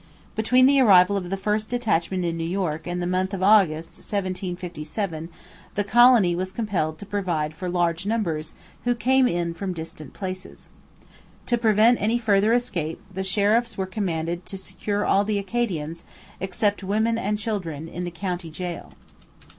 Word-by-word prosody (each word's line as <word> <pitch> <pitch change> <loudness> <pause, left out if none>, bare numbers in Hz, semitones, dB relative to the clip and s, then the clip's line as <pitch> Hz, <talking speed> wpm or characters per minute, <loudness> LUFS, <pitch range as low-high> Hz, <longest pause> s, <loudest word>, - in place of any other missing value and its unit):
Between 250 +4 +4
the 275 +1 +5
arrival 195 -4 +6
of 180 -3 -3
the 195 - -2
first 210 +2 -1
detachment 190 -7 0
in 170 -1 -1
New 165 - -3
York 165 -2 -2
and 175 0 -2
the 175 - -2
month 185 +2 0
of 190 - -3
August 185 -6 +4
1757 180 -3 -4 0.5
the 205 - +1
colony 230 -4 +5
was 185 +1 -3
compelled 180 -9 -2
to 205 - -9
provide 175 -7 -2
for 180 +3 -5
large 175 +1 0
numbers 175 -9 -2 0.3
who 245 0 +1
came 260 +2 +3
in 170 -4 -1
from 185 +2 -4
distant 160 -3 -8
places. 185 -1 -7 0.8
To 240 - +2
prevent 225 +1 +4
any 225 +3 +2
further 210 -2 +3
escape 180 -10 -1
the 190 +1 -3
sheriffs 210 +5 +1
were 190 - -1
commanded 175 -3 -2
to 195 - -4
secure 205 +2 -3
all 200 - +3
the 210 0 0
Acadians, 185 -7 -2 0.4
except 200 +2 -1
women 220 +4 +1
and 210 +2 -1
children, 180 -8 -4
in 175 +2 -5
the 175 - -3
county 175 -1 -4
gaol. 175 +2 -6
190 Hz, 160 wpm, -24 LUFS, 175-215 Hz, 0.8 s, arrival